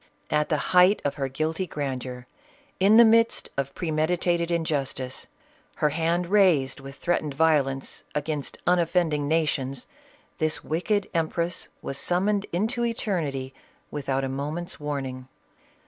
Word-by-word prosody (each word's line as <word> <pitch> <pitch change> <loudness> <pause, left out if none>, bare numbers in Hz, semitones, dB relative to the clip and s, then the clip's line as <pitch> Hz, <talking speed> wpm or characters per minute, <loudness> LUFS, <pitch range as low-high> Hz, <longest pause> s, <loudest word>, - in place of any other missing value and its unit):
At 150 0 +1
the 155 - +2 0.2
height 180 +3 +6
of 140 - +1
her 135 -1 -2
guilty 155 +7 -2
grandeur, 130 -4 -4 0.5
in 200 +4 +6
the 235 - +9
midst 230 +1 +3
of 140 0 -3
premeditated 170 +1 0
injustice, 140 -6 -2 0.5
her 150 - +2
hand 165 +3 0
raised 175 -10 +3
with 135 0 -10
threatened 155 -4 -1
violence 140 -4 +1
against 150 -1 -2
unof 175 -2 +3
fending 160 -5 +1
nations, 140 -5 0 0.5
this 155 0 0
wicked 190 +6 0
empress 170 +1 -1 0.2
was 135 - -1
summoned 200 +3 +1
into 220 +7 0
eternity 160 - -2 0.4
without 135 -2 -1
a - - 0
moment's 150 +7 -4
warning. 135 -3 -4
155 Hz, 130 wpm, -26 LUFS, 140-175 Hz, 0.5 s, the